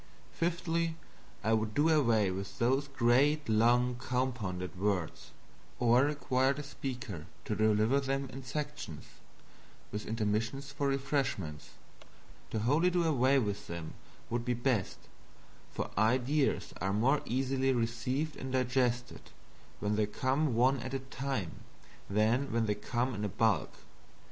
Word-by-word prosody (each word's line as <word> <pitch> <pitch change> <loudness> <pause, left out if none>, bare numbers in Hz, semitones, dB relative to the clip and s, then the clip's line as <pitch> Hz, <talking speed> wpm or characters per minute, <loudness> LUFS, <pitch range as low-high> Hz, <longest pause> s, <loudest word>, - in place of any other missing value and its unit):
Fifthly, 165 -1 0 0.5
I 110 +2 +2
would 110 -1 0
do 150 +3 +4
away 115 -11 +3
with 95 +2 -5
those 135 +4 +2
great 135 +4 +3
long 120 +3 +3
compounded 120 -9 -2
words; 95 -3 -2 0.5
or 120 +2 +4
require 135 -2 +1
the 145 +2 -6
speaker 125 - -6 0.2
to 105 - -1
deliver 110 +5 +3
them 135 0 -1
in 135 +1 -7
sections, 150 - -5 0.9
with 105 +1 -5
intermissions 115 +5 -1
for 140 0 -1
refreshments. 135 - -2 0.8
To - - -3
wholly 150 +10 +3
do 175 -1 +1
away 140 -4 +3
with 105 -6 -1
them 85 -2 -6 0.4
would 120 0 0
be 125 0 0
best, 120 -5 0 0.7
for - - -4
ideas 130 +7 +1
are 95 +2 0
more 130 +8 +3
easily 135 +2 +1
received 125 +5 -1
and 130 - -5
digested 125 -1 0 0.6
when 105 0 0
they 105 -1 +2
come 130 +4 0
one 130 +3 +3
at 130 +3 -4
a - - -1
time 130 -7 -4 0.5
than 110 +7 +2
when 115 0 +1
they 105 - +1
come 120 +5 -2
in 105 -1 -2
bulk. 110 -4 +2
125 Hz, 135 wpm, -32 LUFS, 110-135 Hz, 0.9 s, do